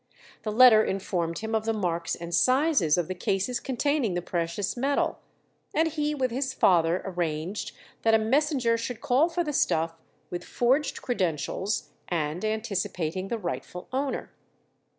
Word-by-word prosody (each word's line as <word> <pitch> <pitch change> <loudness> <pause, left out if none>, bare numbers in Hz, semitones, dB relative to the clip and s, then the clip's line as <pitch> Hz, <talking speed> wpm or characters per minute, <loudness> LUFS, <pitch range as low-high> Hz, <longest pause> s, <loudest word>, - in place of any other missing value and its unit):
The 215 - -3
letter 225 -1 +8
informed 180 -4 -2
him 220 0 -4
of 220 -1 0
the 225 - +1
marks 170 -5 -1
and 170 0 -7
sizes 255 - +3
of 175 -3 0
the 185 - -2
cases 195 +6 -1
containing 265 -5 0
the 175 - -1
precious 170 +3 -2
metal, 275 +3 0 0.6
and 320 +1 +3
he 300 -1 -1
with 260 -3 0
his 265 +2 -2
father 170 -1 +3
arranged 175 0 -3 0.3
that 225 0 +4
a - - +7
messenger 245 0 +2
should 230 0 -4
call 270 +9 +3
for 345 +1 -1
the 300 -2 -3
stuff 165 - +1 0.4
with 175 0 -4
forged 265 +5 0
credentials, 190 - -1 0.2
and 160 +1 -2
anticipating 195 -5 -2
the 235 - -2
rightful 180 -2 -5
owner. 270 +1 -2
215 Hz, 150 wpm, -27 LUFS, 175-255 Hz, 0.6 s, letter